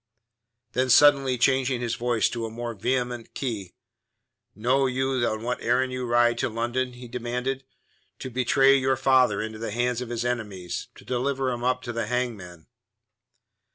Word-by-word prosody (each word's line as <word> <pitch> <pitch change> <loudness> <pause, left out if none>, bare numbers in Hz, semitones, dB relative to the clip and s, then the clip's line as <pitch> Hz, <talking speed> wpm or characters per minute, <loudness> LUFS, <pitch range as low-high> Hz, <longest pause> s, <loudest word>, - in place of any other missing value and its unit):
Then 130 +1 0
suddenly 135 0 +6
changing 130 0 +2
his 120 -1 -2
voice 120 -2 +1
to 115 -1 -4
a - - -7
more 120 +1 -5
vehement 120 +2 -2
key, 105 -9 -4 0.8
"Know 130 +6 +2
you 130 0 0
on 110 0 -3
what 125 +1 -2
errand 130 +2 +1
you 125 0 -3
rode 120 0 +3
to - - 0
London?" 120 +3 -2
he 125 0 -10
demanded. 125 +3 -3 0.5
"To 130 - -7
betray 135 +2 +4
your 130 0 +1
father 130 -6 +3
into 110 0 -6
the 115 - -4
hands 120 +2 -1
of 125 - -5
his 120 0 -3
enemies; 105 -7 -3
to - - -15
deliver 130 +1 -1
him 120 -1 -4
up 125 0 0
to 120 -1 -5
the 115 -2 -2
hangman." 105 -9 -3
125 Hz, 165 wpm, -25 LUFS, 115-130 Hz, 0.8 s, suddenly